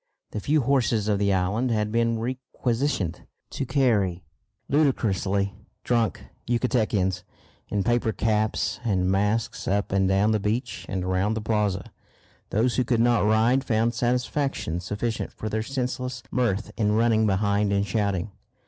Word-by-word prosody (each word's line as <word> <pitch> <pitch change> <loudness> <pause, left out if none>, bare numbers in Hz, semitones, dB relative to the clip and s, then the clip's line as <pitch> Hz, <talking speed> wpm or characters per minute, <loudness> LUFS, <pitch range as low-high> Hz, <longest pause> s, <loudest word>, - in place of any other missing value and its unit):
The 105 - -3
few 150 +8 +2
horses 120 -5 +1
of 105 -2 +1
the 100 -1 +2
island 100 +7 +1
had 105 -2 0
been 115 0 +1
requisitioned 120 - -2 0.2
to 135 - -3
carry 105 -10 +1 0.4
ludicrously 100 -9 +1 0.3
drunk 115 -3 0 0.2
Yucatecans 110 -7 +1 0.5
in 100 -1 0
paper 120 +1 +1
caps 110 0 0
and 95 -5 +1
masks 110 +5 0
up 100 +1 0
and 95 0 +2
down 100 +3 +3
the 110 - +2
beach 110 +5 -2
and 95 -2 -2
round 95 +4 0
the - - -2
plaza. 105 -3 -1 0.6
Those 120 +4 +1
who 130 - +3
could 120 -1 +1
not 120 -2 +3
ride 115 +5 +3
found 115 -1 +1
satisfaction 125 - -1
sufficient 105 +5 -3
for 110 - -5
their 110 +1 -1
senseless 125 0 -3
mirth 115 -4 0
in 105 -2 +2
running 110 -1 +3
behind 100 +1 +1
and 100 0 +1
shouting. 100 -2 -1
110 Hz, 145 wpm, -25 LUFS, 100-120 Hz, 0.6 s, down